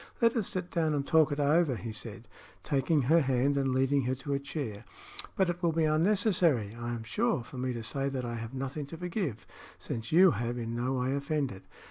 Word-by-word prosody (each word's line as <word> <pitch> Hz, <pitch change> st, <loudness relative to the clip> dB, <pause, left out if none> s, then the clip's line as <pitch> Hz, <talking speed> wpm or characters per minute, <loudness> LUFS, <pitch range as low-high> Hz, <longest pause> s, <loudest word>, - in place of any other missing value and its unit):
"Let 230 Hz, 0 st, +3 dB
us 220 Hz, -5 st, 0 dB
sit 185 Hz, -1 st, -4 dB
down 160 Hz, -3 st, +1 dB
and 140 Hz, -1 st, -1 dB
talk 160 Hz, -2 st, +4 dB
it 145 Hz, -, -2 dB
over," 145 Hz, -1 st, +3 dB
he 115 Hz, 0 st, -6 dB
said, 110 Hz, 0 st, -7 dB, 0.4 s
taking 145 Hz, +1 st, +1 dB
her 160 Hz, +6 st, +4 dB
hand 135 Hz, +1 st, +2 dB
and 135 Hz, -1 st, +1 dB
leading 135 Hz, +1 st, +2 dB
her 130 Hz, +1 st, 0 dB
to 140 Hz, +2 st, -4 dB
a 140 Hz, -, +1 dB
chair. 135 Hz, -7 st, -5 dB, 0.5 s
"But 190 Hz, -, +2 dB
it 175 Hz, 0 st, -3 dB
will 170 Hz, -2 st, +2 dB
be 165 Hz, 0 st, +1 dB
unnecessary, 165 Hz, -, +2 dB
I 120 Hz, +1 st, -5 dB
am 120 Hz, -2 st, -4 dB
sure, 210 Hz, -, 0 dB
for 125 Hz, +2 st, -9 dB
me 130 Hz, 0 st, -1 dB
to 115 Hz, -1 st, -5 dB
say 135 Hz, +4 st, -1 dB
that 130 Hz, -2 st, -3 dB
I 120 Hz, -, -4 dB
have 115 Hz, +3 st, -6 dB
nothing 135 Hz, +2 st, -4 dB
to 165 Hz, -, -8 dB
forgive, 175 Hz, -, -3 dB, 0.3 s
since 115 Hz, -1 st, -5 dB
you 180 Hz, +3 st, +7 dB
have 120 Hz, +1 st, -2 dB
in 115 Hz, -1 st, -4 dB
no 125 Hz, +2 st, -1 dB
way 130 Hz, +1 st, 0 dB
offended." 140 Hz, -, -2 dB
140 Hz, 220 wpm, -30 LUFS, 120-160 Hz, 0.5 s, you